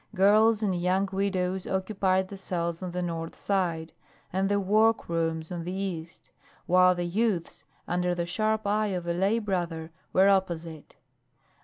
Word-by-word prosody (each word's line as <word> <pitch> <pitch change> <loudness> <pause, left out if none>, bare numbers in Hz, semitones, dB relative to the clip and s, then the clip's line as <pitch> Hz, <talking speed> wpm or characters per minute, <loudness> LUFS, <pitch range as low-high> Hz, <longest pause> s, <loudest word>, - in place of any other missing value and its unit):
Girls 215 +3 +4
and 195 -3 +1
young 185 +2 +1
widows 190 -1 -1
occupied 190 -1 0
the 200 - -7
cells 170 -3 -3
on 185 - -4
the 180 +1 -3
north 165 -1 -4
side, 170 -5 -1 0.4
and 190 +1 +1
the 205 0 +2
work 215 +3 +3
rooms 165 -1 -2
on 175 -2 -4
the 175 - -4
east, 180 -4 -5 0.3
while 185 0 +5
the 175 0 -2
youths, 190 -1 -1 0.2
under 180 0 0
the 170 -1 -1
sharp 215 +4 0
eye 210 +1 +1
of 180 -3 -3
a 170 - 0
lay 195 +6 +2
brother, 175 -6 -3 0.2
were 190 +1 +5
opposite. 170 -5 -1
185 Hz, 160 wpm, -27 LUFS, 170-200 Hz, 0.4 s, while